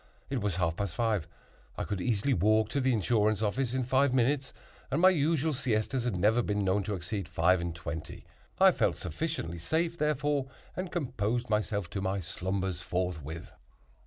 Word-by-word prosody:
It 135 -4 0
was 100 -4 0
half 85 -2 0
past 100 -4 -2
five; 110 -9 0 0.5
I - - -1
could 100 -3 -3
easily 120 +4 +1
walk 110 +3 +3
to 140 - 0
the 130 0 +3
insurance 110 -2 +2
office 125 +4 0
in 130 - +1
five 130 +1 +2
minutes; 130 +2 +1 0.4
and 135 +4 0
my 185 +2 +7
usual 160 -1 +1
siestas 125 -1 0
had 120 -5 0
never 105 +6 +3
been 105 -2 0
known 95 +2 +2
to 105 - -1
exceed 95 +1 -4
five 90 +1 +3
and 85 -1 -3
twenty. 80 -2 -6 0.3
I - - +8
felt - - +1
sufficiently 85 - -3
safe, 165 - -1
therefore, 145 -2 +1 0.3
and 185 -1 -4
composed 120 - -1
myself 105 -3 0
to 100 - -3
my 95 +1 -1
slumbers 95 0 -3
forthwith. 90 -3 -3
110 Hz, 175 wpm, -30 LUFS, 95-130 Hz, 0.5 s, I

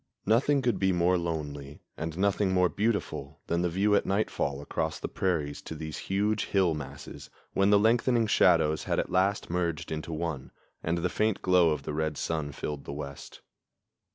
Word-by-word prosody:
Nothing 135 +6 +3
could 120 -4 +1
be 95 -1 +3
more 90 +1 +3
lonely 75 -5 -4
and 80 +1 -5
nothing 100 0 +2
more 90 -1 +3
beautiful 105 +5 -2
than 85 +1 0
the 90 - +1
view 100 +5 +2
at - - +4
nightfall 95 -8 -1
across 80 0 -3
the - - -3
prairies 75 -6 -1
to 80 - -7
these 80 0 -6
huge 105 +2 +1
hill 95 -4 +2
masses, 70 -1 -8 0.2
when 100 +1 +3
the 105 - +6
lengthening 115 +2 +3
shadows 80 -6 +3
had - - 0
at - - -1
last 95 +1 +1
merged 85 -4 -2
into 80 +1 -4
one 80 -4 -3 0.3
and 85 +2 -1
the 85 +1 0
faint 105 +3 0
glow 90 -2 +5
of 75 -3 -1
the - - -4
red 80 -1 -1
sun 80 -3 -2
filled 70 0 -5
the - - -6
west. 70 -1 -8
85 Hz, 180 wpm, -29 LUFS, 75-100 Hz, 0.3 s, the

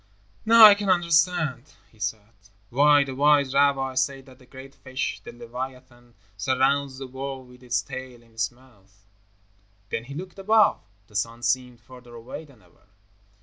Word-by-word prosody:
"Now 230 0 +9
I 210 - +10
can 205 -1 -3
understand," 170 -6 +1 0.2
he 110 - -25
said, 105 +1 -4 0.4
"why 145 +3 +5
the 135 -1 -7
wise 140 -1 +3
rabbis 135 -2 +2
say 135 0 -5
that 130 -1 -18
the 125 - -20
great 135 +1 -12
fish, 130 0 -5
the - - -9
leviathan, 120 0 -9 0.2
surrounds 130 +5 0
the 135 - -7
world 130 0 -7
with 125 0 -17
its 120 -1 -1
tail 130 -2 -9
in 115 - -24
its 115 0 -2
mouth." 100 -6 -25 0.9
Then 115 - -3
he 140 +2 -9
looked 185 +3 -8
above. 215 +2 +3 0.2
The 105 - -22
sun 115 +4 -3
seemed 125 0 -1
further 125 0 -15
away 120 +7 -9
than 130 -9 -21
ever. 90 +3 -27
130 Hz, 165 wpm, -24 LUFS, 120-140 Hz, 0.9 s, I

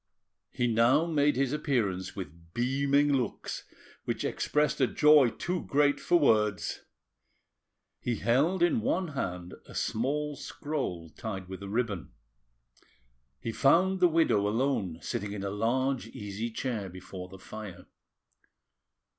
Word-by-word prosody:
He 120 - -1
now 120 +6 +4
made 150 -3 +2
his 135 +1 +1
appearance 100 -11 -1
with 85 -3 -9
beaming 140 +4 +2
looks, 125 -5 -2 0.4
which - - -2
expressed 150 -2 0
a 130 - +5
joy 150 -3 +6
too 180 +8 -3
great 145 0 +3
for 175 - +3
words. 105 - +2 1.2
He 120 - -1
held 140 - +2
in 170 -10 +3
one 175 - 0
hand 90 -11 -4
a - - -12
small 145 +6 -1
scroll 135 - -4
tied 95 -4 -6
with 95 +1 -8
a 100 - -6
ribbon. 105 -5 -2 1.3
He 115 - -3
found 175 - +3
the 180 - +6
widow 160 -11 +3
alone, 105 - 0
sitting 100 0 -3
in 100 -1 -5
a 100 - -2
large 125 +4 0
easy 105 +1 -5
chair 110 -4 -3
before 90 0 -9
the 95 - -11
fire. 95 -2 -9
120 Hz, 130 wpm, -29 LUFS, 100-145 Hz, 1.3 s, joy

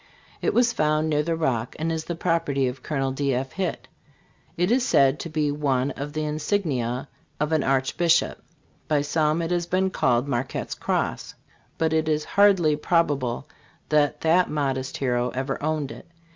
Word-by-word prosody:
It - - 0
was 240 -1 +4
found 155 -3 +1
near 150 0 +2
the 165 +2 -1
Rock, 125 -8 -1
and 165 +1 -1
is 160 -1 -3
the 170 - -3
property 165 -5 0
of 125 +1 -5
Col. 135 -2 -1
D. 135 -1 0
F. 130 +1 -3
Hitt. 190 -3 -3 0.7
It 180 +4 +1
is 250 +1 +3
said 140 - +3
to 170 - -5
be 150 -2 0
one 140 -2 0
of 145 +1 -6
the 155 0 -2
insignia 150 - -1 0.3
of 150 +1 0
an 155 -2 +2
arch 135 0 0
bishop. 170 -1 +2 0.5
By 150 -2 +2
some 155 +2 +1
it 165 - -3
has 175 -1 0
been 190 +1 +1
called 125 -4 +1
Marquette 130 -1 -2
s - - -2
Cross; - - -2 0.4
but 160 -1 +1
it 160 0 +1
is 150 0 0
hardly 195 -7 +4
probable 145 -6 0 0.4
that 150 -1 +2
that 170 +3 +3
modest 135 -3 -2
hero 125 -2 0
ever 135 +1 -2
owned 155 -2 -1
it. - - -11
150 Hz, 180 wpm, -24 LUFS, 135-165 Hz, 0.7 s, was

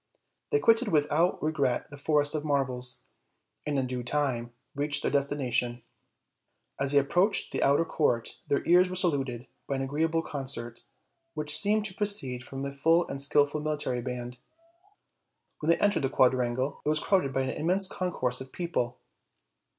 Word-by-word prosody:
They 435 - +4
quitted 230 - +3
without 155 +3 +1
regret 140 -5 0
the - - -8
Forest 145 0 +1
of 155 -1 -2
Marvels, 130 -4 -1 0.6
and 145 -1 0
in 130 - +1
due 125 -1 -3
time 120 -2 -1 0.2
reached 145 +1 0
their - - 0
destination. 125 -4 -1 1.0
As 140 0 +1
they 145 - +4
approached 180 +9 +2
the - - -2
outer 140 +4 +3
court 120 -8 -1
their 140 - 0
ears 180 +2 +5
were 185 - -4
saluted 135 -9 -1 0.2
by 140 - -1
an 135 - -2
agreeable 160 +4 0
concert, 130 -6 -4 0.5
which 150 0 0
seemed 210 +4 +2
to 205 - -2
proceed 185 -13 -1
from 135 +1 -6
a 140 - -3
full 165 +5 +2
and 135 - -3
skillful 145 +1 +2
military 150 -5 -2
band. 125 0 -6 1.2
When 155 - -2
they 170 - +5
entered 205 -5 +2
the 135 - 0
quadrangle 130 0 +1
it - - 0
was 155 0 +3
crowded 185 -8 +1
by 135 - 0
an 130 - -1
immense 180 +5 0
concourse 150 -10 -2
of 130 0 -9
people. 125 -9 -2
140 Hz, 165 wpm, -28 LUFS, 130-165 Hz, 1.2 s, ears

